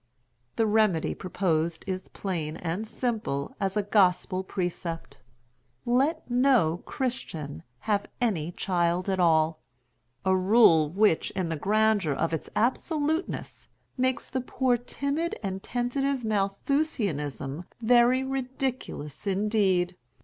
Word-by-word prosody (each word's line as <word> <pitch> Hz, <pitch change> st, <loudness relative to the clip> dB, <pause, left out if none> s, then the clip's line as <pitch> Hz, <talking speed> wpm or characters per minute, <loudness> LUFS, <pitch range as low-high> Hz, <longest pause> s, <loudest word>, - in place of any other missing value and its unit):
The 225 Hz, -, +2 dB
remedy 210 Hz, -6 st, +2 dB
proposed 170 Hz, -3 st, -1 dB
is 185 Hz, -1 st, -4 dB
plain 165 Hz, -6 st, -3 dB
and 180 Hz, +6 st, -3 dB
simple 215 Hz, -, -2 dB
as 195 Hz, +1 st, -1 dB
a 210 Hz, -, +2 dB
gospel 190 Hz, -2 st, +2 dB
precept: 170 Hz, -6 st, -4 dB, 0.7 s
let 260 Hz, +7 st, +1 dB
no 245 Hz, -10 st, +3 dB
Christian 170 Hz, -, -4 dB, 0.2 s
have 205 Hz, -2 st, 0 dB
any 180 Hz, -10 st, 0 dB
child 175 Hz, 0 st, 0 dB
at 190 Hz, -, -1 dB
all—a 135 Hz, -3 st, 0 dB
rule 185 Hz, -5 st, +5 dB
which, 195 Hz, 0 st, +2 dB
in 185 Hz, -3 st, -1 dB
the 165 Hz, -, -1 dB
grandeur 205 Hz, -1 st, +2 dB
of 165 Hz, +4 st, -1 dB
its 160 Hz, -, -3 dB
absoluteness 305 Hz, -, -1 dB, 0.3 s
makes 255 Hz, -1 st, 0 dB
the 260 Hz, -, -2 dB
poor 255 Hz, 0 st, +1 dB
timid 280 Hz, +7 st, -2 dB
and 190 Hz, -1 st, -3 dB
tentative 250 Hz, +3 st, -1 dB
Malthusianism 195 Hz, -, -1 dB
very 245 Hz, +2 st, +4 dB
ridiculous 260 Hz, -, -4 dB
indeed. 195 Hz, -3 st, +1 dB
195 Hz, 110 wpm, -27 LUFS, 165-245 Hz, 0.7 s, rule